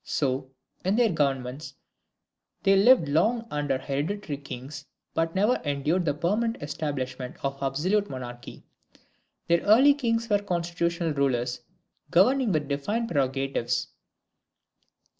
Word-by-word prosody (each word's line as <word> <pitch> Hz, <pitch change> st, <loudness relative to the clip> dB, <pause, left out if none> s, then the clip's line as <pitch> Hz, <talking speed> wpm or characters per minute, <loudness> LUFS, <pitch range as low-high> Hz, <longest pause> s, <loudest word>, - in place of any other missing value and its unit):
So, 130 Hz, -2 st, -1 dB, 0.3 s
in 190 Hz, +3 st, +1 dB
their 230 Hz, -2 st, +3 dB
governments 135 Hz, -2 st, -2 dB, 0.9 s
they 195 Hz, 0 st, +5 dB
lived 205 Hz, -, +6 dB
long 220 Hz, +11 st, +1 dB
under 145 Hz, -2 st, 0 dB
hereditary 145 Hz, +5 st, -3 dB
kings, 135 Hz, +1 st, -8 dB, 0.3 s
but 165 Hz, +1 st, -1 dB
never 210 Hz, +6 st, +3 dB
endured 150 Hz, +5 st, 0 dB
the 145 Hz, -, +1 dB
permanent 215 Hz, +9 st, 0 dB
establishment 135 Hz, -4 st, -4 dB
of 135 Hz, 0 st, -3 dB
absolute 175 Hz, +10 st, 0 dB
monarchy. 120 Hz, -2 st, -8 dB, 0.8 s
Their 170 Hz, 0 st, +3 dB
early 250 Hz, +8 st, +6 dB
kings 230 Hz, -4 st, -1 dB
were 205 Hz, -2 st, +3 dB
constitutional 170 Hz, -3 st, -1 dB
rulers, 125 Hz, -3 st, 0 dB, 0.5 s
governing 230 Hz, +7 st, +4 dB
with 155 Hz, -4 st, 0 dB
defined 205 Hz, +12 st, -2 dB
prerogatives. 135 Hz, -4 st, -1 dB
155 Hz, 115 wpm, -26 LUFS, 135-205 Hz, 0.9 s, lived